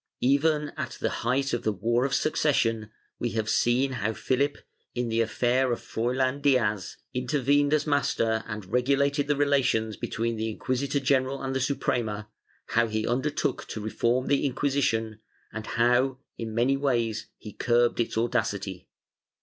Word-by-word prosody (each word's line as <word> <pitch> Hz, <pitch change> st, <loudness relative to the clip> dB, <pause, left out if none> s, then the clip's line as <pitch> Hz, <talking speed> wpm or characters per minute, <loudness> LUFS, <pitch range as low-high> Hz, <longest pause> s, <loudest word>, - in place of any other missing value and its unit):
Even 150 Hz, +3 st, +2 dB
at 140 Hz, -6 st, -4 dB
the -, -, 0 dB
height 135 Hz, +4 st, 0 dB
of 120 Hz, -, 0 dB
the 110 Hz, -, 0 dB
War 120 Hz, +5 st, +1 dB
of 135 Hz, 0 st, 0 dB
Succession, 115 Hz, -8 st, +1 dB, 0.3 s
we 120 Hz, -, -2 dB
have 110 Hz, -1 st, -1 dB
seen 125 Hz, +4 st, +2 dB
how 110 Hz, -3 st, -1 dB
Philip, 140 Hz, +5 st, 0 dB, 0.4 s
in 120 Hz, -1 st, -1 dB
the 115 Hz, 0 st, +1 dB
affair 125 Hz, +3 st, +1 dB
of 120 Hz, -, -1 dB
Froilan 130 Hz, +4 st, -1 dB
Diaz, 115 Hz, -9 st, +1 dB, 0.2 s
intervened 140 Hz, +3 st, +2 dB
as 155 Hz, -1 st, +2 dB
master 115 Hz, -6 st, +1 dB
and 105 Hz, -3 st, -5 dB
regulated 140 Hz, +6 st, +1 dB
the 145 Hz, -, +2 dB
relations 135 Hz, -6 st, +2 dB
between 115 Hz, 0 st, -2 dB
the 110 Hz, +1 st, -1 dB
inquisitor 130 Hz, +5 st, -1 dB
general 135 Hz, 0 st, +1 dB
and 135 Hz, 0 st, -2 dB
the 135 Hz, -, 0 dB
Suprema, 115 Hz, -6 st, -1 dB, 0.4 s
how 115 Hz, 0 st, +3 dB
he 110 Hz, 0 st, -2 dB
undertook 130 Hz, +5 st, -1 dB
to -, -, -5 dB
reform 120 Hz, +4 st, 0 dB
the 140 Hz, -, +2 dB
Inquisition 125 Hz, -5 st, 0 dB, 0.3 s
and 110 Hz, 0 st, -6 dB
how, 125 Hz, +3 st, +2 dB, 0.2 s
in 110 Hz, -1 st, -5 dB
many 125 Hz, +4 st, +3 dB
ways 115 Hz, -6 st, 0 dB
he 105 Hz, -, -10 dB
curbed 120 Hz, 0 st, +2 dB
its 115 Hz, -1 st, -1 dB
audacity. 105 Hz, -6 st, -1 dB
125 Hz, 155 wpm, -27 LUFS, 115-135 Hz, 0.4 s, how